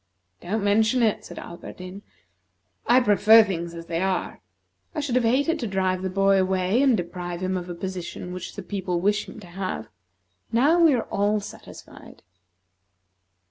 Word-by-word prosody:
"Don't 205 +4 -2
mention 220 +4 +3
it," 220 -2 +1
said - - -10
Alberdin. 180 +2 -9 0.9
"I 245 +2 +6
prefer 215 0 +6
things 170 -4 -4
as 165 0 -8
they 165 0 -2
are. 190 -1 -2 0.5
I - - -1
should 285 -4 -2
have 250 0 +3
hated 285 +8 +2
to 235 - -2
drive 190 -2 0
the 190 - -2
boy 195 +1 +3
away, 190 +5 +1
and 265 -5 +4
deprive 175 0 -5
him 185 0 -1
of 180 -1 -4
a 175 - -5
position 180 -1 -6
which 185 - -7
the - - -6
people 185 -3 -2
wish 205 +3 0
him - - -10
to - - -11
have. 180 - -5 0.6
Now 280 +9 +4
we 310 -5 +6
are 235 - -1
all 205 +1 +1
satisfied." 205 - -12
195 Hz, 170 wpm, -24 LUFS, 180-225 Hz, 0.9 s, I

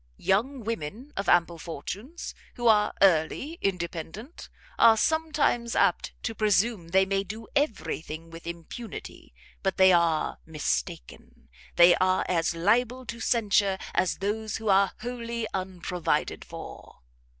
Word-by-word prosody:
Young 245 +8 0
women 230 - -5
of 195 -1 -2
ample 170 -1 +3
fortunes, 200 - -7 0.2
who 240 -1 -1
are 210 -2 +5
early 195 - +2
independent, 180 - -4 0.3
are 225 -1 +7
sometimes 300 -5 +1
apt - - +2
to 225 - -2
presume 215 -3 +1
they 190 +3 +3
may 195 0 0
do 220 +3 -8
every 280 - 0
thing 160 +1 -9
with 165 0 -10
impunity; 170 +6 -8 0.3
but 195 -2 -1
they 190 0 +7
are 170 -2 +2
mistaken; 70 - -4 0.3
they 175 0 +8
are 185 0 +2
as 170 -1 0
liable 240 +8 +1
to 235 0 -6
censure 205 -4 +2 0.2
as 185 - +1
those 215 +2 -2
who 220 -1 -3
are 195 0 +4
wholly 235 -1 -4
unprovided 185 -2 -2
for." - - -11
195 Hz, 130 wpm, -27 LUFS, 170-235 Hz, 0.3 s, they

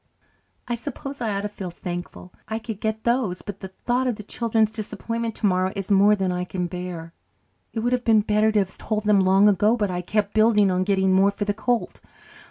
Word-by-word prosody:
I 240 - -1
suppose 275 +2 -6
I 230 - 0
ought 200 0 -1
to 210 - -2
feel 195 -3 -7
thankful 175 +1 -7
I 220 - -2
could 220 -2 -7
get 220 0 -2
those. 235 -7 0
But 205 -2 -7
the 190 - -6
thought 245 +7 -1
of 245 - 0
the 210 - -9
children's 220 0 0
disappointment 230 +1 -4
tomorrow 185 -3 +1
is 195 0 -4
more 200 +2 +6
than 190 -2 -1
I 180 0 -2
can 180 0 -3
bear. 175 -2 -6 0.6
It 225 - -3
would 245 +2 0
have 250 -1 0
been 220 -2 +4
better 210 +1 +2
to 215 - 0
have 190 -2 0
told 215 -1 -2
them 210 -1 +4
long 190 +2 +5
ago, 210 +4 +3
but 205 -4 0
I 180 0 -2
kept 205 +2 -1
building 215 -3 +4
on 185 0 0
getting 190 -1 +2
more 195 +1 +5
for 205 +1 -3
the 205 - 0
colt. 240 +3 -2
210 Hz, 220 wpm, -24 LUFS, 190-225 Hz, 0.6 s, more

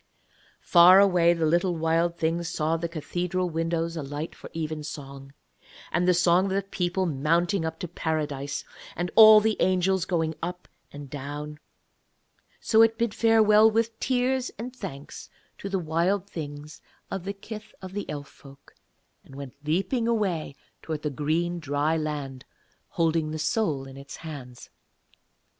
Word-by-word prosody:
Far 180 +2 +8
away 180 -4 +5
the 165 -2 -1
little 175 +3 +2
Wild 165 +1 +1
Thing 165 +1 0
saw 165 -1 -1
the 165 +1 -3
cathedral 175 +2 -2
windows 165 +1 -1
alight 145 +1 -5
for - - -12
evensong, 145 -4 -6 0.6
and 180 - +1
the 180 - +5
song 175 +1 +4
of 190 - -2
the 195 0 0
people 185 -1 -1
mounting 170 +5 +1
up 160 0 -4
to 175 - -3
Paradise, 150 -4 -3 0.3
and 175 +1 -3
all 215 -1 +10
the 215 0 0
angels 185 0 +2
going 160 -3 0
up 180 +1 -5 0.2
and 145 -1 -9
down. 145 +2 -7 1.0
So 220 -1 +4
it 225 0 +4
bid 230 -2 0
farewell 220 -1 +5
with 225 0 -1
tears 255 0 0
and 245 +4 -7
thanks 160 - -8 0.3
to 195 - -5
the 195 - 0
Wild 175 +4 0
Things 150 -4 -8 0.3
of 190 - -4
the 195 - -3
kith 215 +2 -10
of 190 0 -9
Elf 145 -2 -5
folk, 140 0 -17 0.5
and 135 - -15
went 140 -2 -8
leaping 195 - 0
away 190 -11 -1 0.3
towards 155 -2 -5
the 150 - -1
green 165 +5 -1
dry 145 +1 0
land, 145 -4 -4 0.5
holding 165 -2 0
the 155 - -4
soul 155 - -1
in 135 0 -11
its 140 0 -9
hands. 135 -7 -10
170 Hz, 150 wpm, -26 LUFS, 150-190 Hz, 1.0 s, all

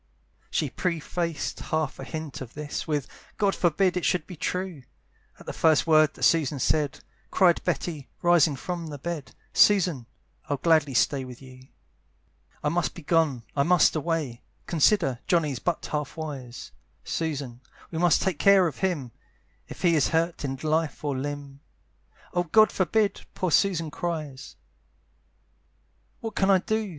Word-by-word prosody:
She - - -1
prefaced 170 -2 -2
half 155 -3 -2
a - - -5
hint 155 0 -6
of 125 -3 -9
this 150 -1 -5
With, 145 -4 -1 0.3
"God 200 -2 +2
forbid 180 +2 +2
it 180 - -1
should 175 -4 +1
be 180 - -9
true!" 180 -1 -3 0.6
At - - -14
the - - -5
first 160 -2 +3
word 155 -2 +4
that - - -8
Susan 155 -4 +3
said 145 +1 0 0.3
Cried 175 -3 +3
Betty, 155 -6 -3
rising 170 -4 +4
from 170 +4 -5
the 145 -2 -6
bed, 150 -3 -6 0.2
"Susan, 175 - +4 0.4
I'd 145 -2 -2
gladly 155 -5 +3
stay 130 +3 +2
with 125 -1 -10
you. 130 -1 -14 1.0
"I 150 - +2
must 175 +2 -1
be 170 - -10
gone, 150 -6 +1
I 140 - +2
must 170 +3 +4
away, 155 -6 -2 0.2
"Consider, 160 - +2
Johnny's 150 -7 +1
but 175 -2 -2
half 150 +1 -4
wise; 135 -6 -7 0.3
"Susan, 140 -7 -3 0.3
we 160 - -3
must 175 -2 +3
take 180 -4 -1
care 195 -2 +6
of 165 - -3
him, 160 -11 -1 0.6
"If - - -10
he 175 -2 +4
is 150 - +3
hurt 165 0 0
in 135 -1 -2
life 155 0 0
or 145 -2 -1
limb" 140 0 -5 0.7
"Oh 175 0 +1
God 215 +6 +5
forbid!" 200 +2 0
poor 185 -2 -1
Susan 165 -4 +2
cries. 155 -6 -5 1.7
"What 225 -1 -5
can 195 - +2
I 195 - +7
do?" 220 +3 -1
155 Hz, 155 wpm, -26 LUFS, 140-175 Hz, 1.7 s, I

